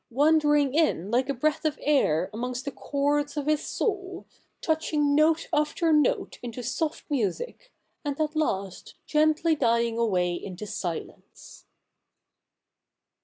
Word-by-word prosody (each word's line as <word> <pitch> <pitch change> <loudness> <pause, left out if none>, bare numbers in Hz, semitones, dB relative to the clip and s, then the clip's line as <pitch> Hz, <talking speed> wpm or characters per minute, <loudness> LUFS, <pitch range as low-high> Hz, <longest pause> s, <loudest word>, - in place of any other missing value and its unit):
wanderincr 295 0 +3
in 285 - +1
like 255 +3 +1
a - - +1
breath 300 +4 0
of 310 -1 0
air 185 - +2
amons; 250 +3 -3
st 255 - -5
the 280 - -3
chords 290 +1 -1
of 290 - -1
his 305 -1 +1
soul, 380 -4 -3 0.3
touching 310 -2 +1
note 310 +2 +3
after 300 +2 +2
note 300 -3 +1
into 245 0 -6
soft 300 +6 -2
music, 295 - -3 0.3
and 285 -1 -3
at 305 0 -1
last 195 - -2
gently 310 +1 +2
dying 235 -3 +1
away 180 -6 +1
into 185 +3 -6
silence.' 190 -5 -7
290 Hz, 130 wpm, -26 LUFS, 235-310 Hz, 0.3 s, wanderincr